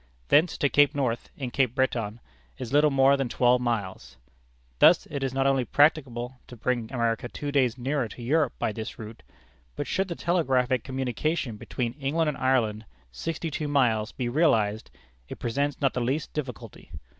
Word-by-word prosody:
Thence 160 +3 +4
to 145 - +2
Cape 145 +1 +4
North, 125 -5 -1
in 130 -3 -4
Cape 130 -3 +1
Breton, 120 -4 -1 0.4
is 130 -1 -6
little 150 +1 +5
more 135 0 +4
than 135 -3 -2
twelve 125 +1 +3
miles. 110 - -3 0.6
Thus - - +6
it 140 -2 -3
is 135 -1 -1
not 135 +1 0
only 135 -2 +3
practicable 130 -3 +1
to 125 - -11
bring 120 -1 -2
America 115 -1 -1
two 145 +4 -5
days 130 -4 +2
nearer 130 0 -1
to 120 - -10
Europe 145 +2 +1
by - - -1
this 110 +1 -6
route, 110 0 -9 0.5
but - - -3
should 190 +1 -1
the 170 - -4
telegraphic 130 -9 +1
communication 130 0 -2
between 120 +2 -4
England 150 +3 0
and 145 - -4
Ireland, 115 -5 +1 0.3
sixty 165 - -4
two 150 0 -3
miles, 120 -7 +1
be 125 - -4
realized, 115 -7 +1 0.4
it - - -7
presents 140 +5 -2
not 135 -3 +1
the 125 - -2
least 135 +6 -2
difficulty. 130 -6 -7
130 Hz, 175 wpm, -26 LUFS, 120-145 Hz, 0.6 s, Thus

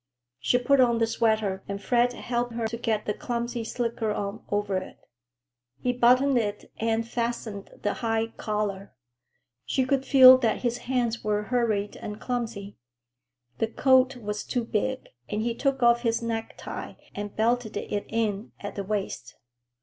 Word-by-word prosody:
She 245 - +2
put 265 +2 +4
on 240 -2 +4
the 230 - +3
sweater 220 -4 0
and 200 0 -4
Fred 245 +4 +2
helped 240 0 -2
her 230 -1 -1
to 225 - -5
get 225 -2 -1
the 210 - 0
clumsy 235 0 -3
slicker 230 -1 -2
on 200 -1 -4
over 205 -2 0
it. 185 - -6 0.8
He 250 - 0
buttoned 250 +2 +4
it 210 -2 -4
and 225 0 0
fastened 230 -4 -3
the 205 - +1
high 225 -1 0
collar. 205 -2 -3 0.7
She 255 - 0
could 270 0 +1
feel 260 -1 +9
that 230 -1 0
his 240 0 0
hands 240 -3 0
were 210 0 0
hurried 215 -4 0
and 210 0 -7
clumsy. 225 -5 -4 0.8
The 225 - +2
coat 260 +2 +4
was 210 -2 -4
too 245 -3 -2
big, 255 +4 -2 0.2
and 210 +1 -1
he 235 0 0
took 270 +1 0
off 235 0 +5
his 230 -1 0
necktie 225 -1 -5 0.2
and 205 0 -6
belted 225 -1 +1
it 205 0 -3
in 220 -2 -1
at 205 - -6
the 200 - -4
waist. 195 - -4
230 Hz, 160 wpm, -27 LUFS, 210-245 Hz, 0.8 s, feel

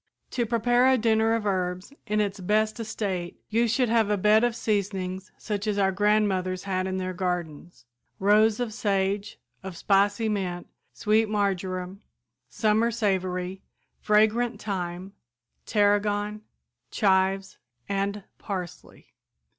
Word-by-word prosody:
"To 240 -2 -1
prepare 240 +2 +3
a 260 - +4
dinner 225 0 +2
of 225 -2 -3
herbs 185 +3 -2
in 210 +1 0
its 200 -1 -2
best 215 +4 0
estate 195 -6 -4
you 230 +2 +2
should 245 +2 +1
have 225 -2 +2
a 210 - +2
bed 210 +3 +4
of 240 -2 +1
seasonings 195 -4 -2
such 210 -1 -4
as 210 -1 0
our 195 -1 +3
grandmothers 195 -2 +1
had 185 -1 -1
in 190 0 -2
their 185 0 -3
gardens, 175 -5 -4 0.3
rows 210 +3 +3
of 240 -3 -2
sage, 200 -1 -1 0.2
of 190 -2 -8
spicy 205 +4 +2
mint, 185 -4 -2 0.3
sweet 215 +1 +1
marjoram, 190 -2 -2 0.5
summer 215 - +2
savory, 190 -4 -2 0.4
fragrant 220 +2 +2
thyme, 185 -2 -4 0.5
tarragon, 205 0 +1 0.5
chives 195 -1 +1 0.3
and 200 +1 -2 0.2
parsley. 185 -4 -7
205 Hz, 125 wpm, -26 LUFS, 190-215 Hz, 0.5 s, a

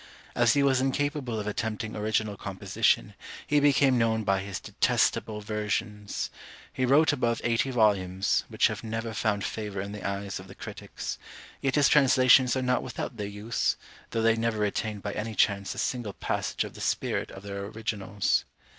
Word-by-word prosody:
As 120 -1 +4
he 140 - +3
was 135 -2 +3
incapable 135 -3 -1
of 105 - -4
attempting 110 0 -3
original 105 0 0
composition, 100 -1 0 0.3
he 150 +1 +3
became 140 -3 +4
known 110 -1 +2
by 95 -1 +2
his 95 0 -5
detestable 105 -1 +1
versions. 105 -1 -3 0.4
He 130 - 0
wrote 150 +3 +5
above 120 -4 0
eighty 115 +2 +1
volumes, 100 -6 +2
which - - +2
have - - 0
never 115 0 -3
found 105 -1 0
favour 105 -3 -4
in 100 +1 -4
the 105 - -7
eyes 100 0 -3
of 95 - -11
the 95 - -12
critics; - - -7 0.4
yet 135 -1 0
his 145 -2 +5
translations 130 -2 +5
are 130 - -1
not 125 0 +2
without 120 - -5
their 105 -1 -3
use, 105 +3 -1 0.3
though 115 - -1
they 115 0 +5
never 115 -1 0
retain 105 0 -1
by 100 - -3
any 110 0 -4
chance 100 -2 +1
a - - -11
single 120 -6 -2
passage - - -2
of - - -8
the - - -10
spirit - - -1
of 95 - -10
their 100 -1 -5
originals. 105 -2 -1
110 Hz, 175 wpm, -28 LUFS, 100-125 Hz, 0.4 s, wrote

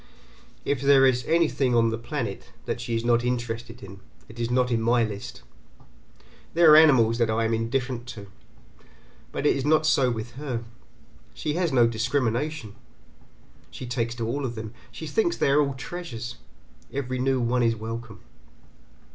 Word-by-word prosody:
If 140 -3 0
there 140 -1 +6
is 125 -2 +2
anything 155 -6 +2
on 115 -1 +3
the 115 - -2
planet 120 -5 -5 0.2
that 120 - -3
she 120 -1 -3
is 115 +1 -2
not 120 0 +3
interested 120 -1 -3
in 100 0 -11 0.3
it 115 +2 -13
is 115 0 -1
not 125 0 +1
in 115 -1 +1
my 120 +1 +3
list. 105 -2 -6 1.1
There 170 -2 +7
are - - +10
animals 125 -8 +6
that 115 -2 +2
I 110 +1 +1
am 115 - 0
indifferent 120 +2 -2
to, 110 -5 -8 1.1
but 140 - -4
it - - +4
is 135 - -2
not 155 +2 +3
so 140 -4 +3
with 115 0 -4
her. 125 -6 -3 0.7
She 150 - -2
has 175 0 0
no 125 -3 +5
discrimination, 120 +1 -1 1.0
she - - -8
takes 120 -1 -2
to 115 -2 -3
all 140 +5 -2
of 120 -3 -3
them, 110 0 -7 0.2
she - - -8
thinks 365 -6 0
they 140 - +2
are 145 +2 +5
all 140 -2 -1
treasures, 125 -5 -7 0.5
every 130 -2 -3
new 130 0 +1
one 125 +1 +1
is 115 -1 +2
welcome. 115 -1 -7
120 Hz, 170 wpm, -25 LUFS, 115-140 Hz, 1.1 s, are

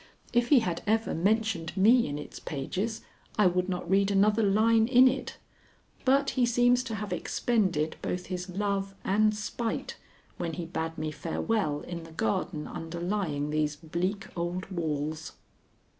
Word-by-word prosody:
If 240 0 +3
he 275 -5 +7
had 175 -6 -2
ever 220 +1 +1
mentioned 200 -1 0
me 230 +5 +5
in 145 0 -3
its 150 - -8
pages, 190 +10 -3 0.4
I 210 - +5
would 180 +1 +2
not 180 -2 -3
read 195 +2 +3
another 205 +2 +3
line 220 +2 +4
in 255 +1 +7
it, 260 +1 -2 0.7
but 275 +1 +3
he 255 - +1
seems 245 +1 +4
to 225 - -3
have 210 0 -4
expended 185 -10 0
both 180 0 -3
his 180 0 -5
love 195 +1 -2
and 215 +2 +3
spite 220 +2 -3 0.4
when 165 -1 -3
he 175 0 -4
bade 160 -1 -4
me 155 0 -2
farewell 165 0 -1
in 170 -1 -6
the 165 0 -12
garden 185 -4 -1
underlying 165 -3 -3
these 150 -1 0
bleak 175 +6 -3
old 175 +2 -3
walls. 155 -2 -3
190 Hz, 155 wpm, -29 LUFS, 165-220 Hz, 0.7 s, he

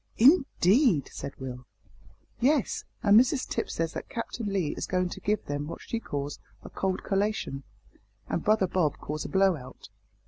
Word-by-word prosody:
"Indeed!" 250 - +4
said 140 - -6
Will. 125 -2 -7 0.7
"Yes; 275 0 +1 0.2
and 205 +1 +7
Mrs 255 +2 +1
Tipps - - -3
says 165 0 -1
that - - -6
Captain 230 -2 -4
Lee 190 -7 0
is - - -4
going 180 -1 0
to - - -7
give 210 +1 -1
them 145 +1 -3
what 165 - -6
she 230 - -3
calls 145 -8 -4 0.2
a - - -10
cold 190 -1 -2
collation, 195 -8 -1 0.7
and - - -2
brother 215 -2 +3
Bob 175 -5 0
calls 150 +1 -5
a - - -4
blow 190 -1 +4
out." 130 -3 -11
190 Hz, 170 wpm, -28 LUFS, 150-220 Hz, 0.7 s, and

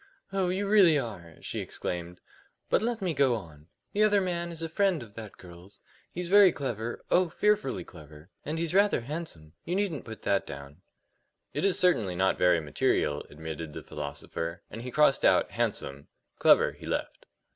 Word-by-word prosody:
"Oh, 190 -2 +1
you 195 +2 -1
really 195 -7 +6
are 85 - -6
" - - -20
she - - -4
exclaimed. 90 0 -5 0.5
"But - - +4
let 230 -2 -2
me 180 -3 0
go 135 -4 +3
on. 80 -7 -10 0.3
The 210 - +1
other 210 -1 +5
man 175 -2 -2
is 165 -1 -5
a - - -1
friend 180 -2 +1
of 105 -3 -14
the 110 -1 -8
girl's: 90 +2 -14 0.3
he's 180 0 -3
very 200 0 +7
clever 120 -5 -4
oh, 180 -1 +4
fearfully 210 -6 +1
clever 75 0 -14
and 155 +2 -3
he's 165 0 -1
rather 200 -7 +4
handsome. 120 - -7
You 175 - -2
needn't 190 - -1
put 110 -1 -9
that 100 -1 +1
down." 70 +4 -9 0.7
"It - - -2
is 195 -2 +3
certainly 145 - +2
not 95 +2 +1
very 90 -1 +4
material," 75 -1 0
admitted 80 0 -7
the - - -7
philosopher, 75 +3 -5
and 115 - -7
he 125 - -6
crossed 150 +1 +3
out - - +4
"handsome"; 70 +1 -2 0.3
"clever" - - +5
he - - -12
left. - - -4
120 Hz, 180 wpm, -28 LUFS, -, 0.7 s, very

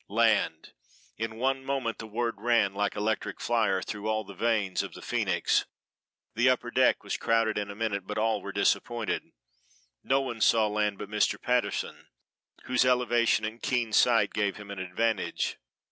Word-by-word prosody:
Land! 105 -7 +1 0.5
In 110 0 -3
one 135 +2 0
moment 135 -4 -2
the 110 - -7
word 115 -1 -3
ran 115 -4 +2
like 100 +1 -1
electric 110 +1 -2
fire 110 -6 +1
through 105 +1 -4
all 110 0 0
the 100 - -11
veins 105 -2 0
of - - -7
the - - -10
Phoenix; - - +1 0.7
the - - +3
upper - - 0
deck - - +3
was - - -3
crowded 115 -1 +1
in 105 -1 -2
a 100 - -7
minute, 100 -3 -2
but 105 - -4
all 110 -1 +1
were 100 - -6
disappointed. 105 +3 0 0.8
No 135 +1 +2
one 120 -4 -4
saw 110 0 +5
land 105 -1 0
but 105 - -6
Mr. 105 0 +1
Patterson, 125 0 -1 0.6
whose 125 -1 +2
elevation 120 -3 +2
and 110 +2 -6
keen 120 -4 -1
sight 115 -4 +4
gave 100 -3 0
him 100 -1 -9
an 100 - -6
advantage. 95 +3 -1
110 Hz, 170 wpm, -28 LUFS, 105-115 Hz, 0.8 s, saw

